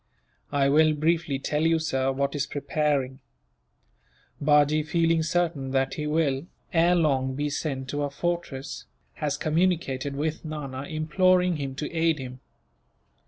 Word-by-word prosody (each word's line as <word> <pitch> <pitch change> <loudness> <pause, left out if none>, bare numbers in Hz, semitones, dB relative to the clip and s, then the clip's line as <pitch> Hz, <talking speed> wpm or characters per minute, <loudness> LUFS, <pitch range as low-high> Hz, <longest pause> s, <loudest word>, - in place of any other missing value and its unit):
"I 140 -1 +2
will 155 +2 +4
briefly 160 -1 +1
tell 150 +2 -1
you, 165 +1 +3
sir, 135 -4 0
what 140 +1 -1
is 145 -1 -1
preparing. 140 -3 -1 1.2
Bajee, 150 +1 +4
feeling 165 +1 +1
certain 160 -4 0
that 135 0 +1
he 150 -1 -3
will, 150 -1 0 0.3
ere 170 +1 +4
long, 135 -6 +1
be 145 +1 -2
sent 135 -3 -3
to 145 +1 -2
a 145 - -1
fortress, 150 -3 -4 0.4
has 150 -1 0
communicated 155 -5 0
with 155 +2 -2
Nana, 140 -4 -5
imploring 180 +3 +2
him 135 -2 -4
to 150 - -4
aid 165 -1 +2
him." 130 -2 -7
150 Hz, 140 wpm, -26 LUFS, 140-160 Hz, 1.2 s, will